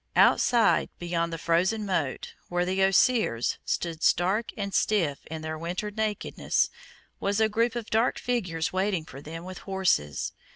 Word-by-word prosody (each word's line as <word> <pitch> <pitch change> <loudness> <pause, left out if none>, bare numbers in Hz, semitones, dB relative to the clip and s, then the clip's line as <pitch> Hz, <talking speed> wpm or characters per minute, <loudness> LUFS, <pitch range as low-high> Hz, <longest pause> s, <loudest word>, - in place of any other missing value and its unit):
Outside, 235 -2 +4
beyond 170 -1 -1
the 165 - -3
frozen 180 +7 +1
moat, 160 -9 -2 0.2
where 175 0 0
the 190 +1 0
osiers, 195 - +3
stood 165 -2 -2
stark 190 +9 +2
and 200 -2 -3
stiff 170 -11 +1
in 160 0 -6
their 155 0 -4
winter 180 +5 -3
nakedness, 215 0 -1 0.5
was 200 +1 0
a 220 - +4
group 230 +2 0
of 235 -2 -5
dark 225 +3 +2
figures 180 -11 -2
waiting 185 -3 0
for 135 - -10
them 165 +3 -8
with 185 0 -8
horses. 185 - 0
185 Hz, 155 wpm, -27 LUFS, 165-210 Hz, 0.5 s, Outside